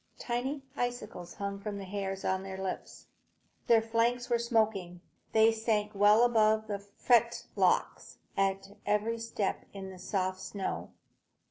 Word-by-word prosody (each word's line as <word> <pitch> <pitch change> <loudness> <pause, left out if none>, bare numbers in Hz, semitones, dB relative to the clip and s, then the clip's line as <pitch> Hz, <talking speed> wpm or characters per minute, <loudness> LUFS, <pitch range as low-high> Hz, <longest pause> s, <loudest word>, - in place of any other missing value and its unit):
Tiny 260 +4 -2
icicles 220 -8 -4
hung 200 0 -4
from 205 0 -4
the 200 - -6
hairs 195 0 -4
on 190 0 +1
their 190 0 -6
lips. 190 -1 -5 0.6
Their 225 -1 +5
flanks 235 +2 +1
were 235 - +3
smoking. 215 -7 0 0.3
They 220 0 +6
sank 220 -2 0
above 215 +1 +5
the 205 -2 -3
fetlocks 235 +4 +1 0.2
at 195 0 0
every 210 +3 0
step 225 -3 -2
in 195 -1 -7
the 185 - -11
soft 185 0 -1
snow. 185 - -4
210 Hz, 130 wpm, -31 LUFS, 195-230 Hz, 0.6 s, They